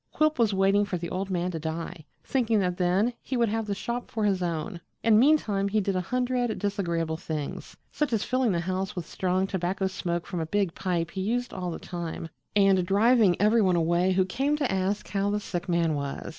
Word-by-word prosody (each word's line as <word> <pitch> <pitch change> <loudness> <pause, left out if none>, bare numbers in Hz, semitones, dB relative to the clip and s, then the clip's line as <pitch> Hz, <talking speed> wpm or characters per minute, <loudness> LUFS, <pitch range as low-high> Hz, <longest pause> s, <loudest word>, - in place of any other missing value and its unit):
Quilp 310 -3 +1
was 225 -3 +4
waiting 195 +1 +3
for 200 -3 -2
the 170 0 -5
old 190 +1 -2
man 180 -1 -1
to 165 - -4
die, 160 0 -5 0.2
thinking 235 -4 +1
that 180 -2 0
then 190 +6 +2
he 260 - -3
would 235 -2 +2
have 225 0 -2
the 200 - -1
shop 240 +4 -4
for 220 - -2
his 195 -3 +1
own, 170 +2 -3 0.2
and 220 -2 +5
meantime 225 -8 +3
he 215 +2 +1
did 195 -1 -1
a 185 - +1
hundred 245 +2 -1
disagreeable 170 -6 -1
things, 155 -3 -5
such 300 -3 -1
as 220 -3 +1
filling 255 -3 +1
the 170 -2 0
house 190 +3 -2
with 175 -3 -4
strong 185 +2 0
tobacco 190 0 -1
smoke 175 -2 -2
from 180 -3 -4
a 160 - -2
big 195 -1 0
pipe 170 -3 -2
he 190 - -4
used 245 +5 -1
all 180 -1 -3
the 165 - -4
time 170 -2 -6 0.3
and 195 -2 +4
driving 205 0 +4
every 215 +3 +4
one 185 -3 +3
away 175 +2 +2
who 185 0 +3
came 270 +10 0
to 285 -4 0
ask 190 +2 -1
how 200 0 0
the 210 +1 0
sick 175 -2 -5
man 170 -2 +2
was. 140 +1 -4
190 Hz, 220 wpm, -27 LUFS, 175-215 Hz, 0.3 s, and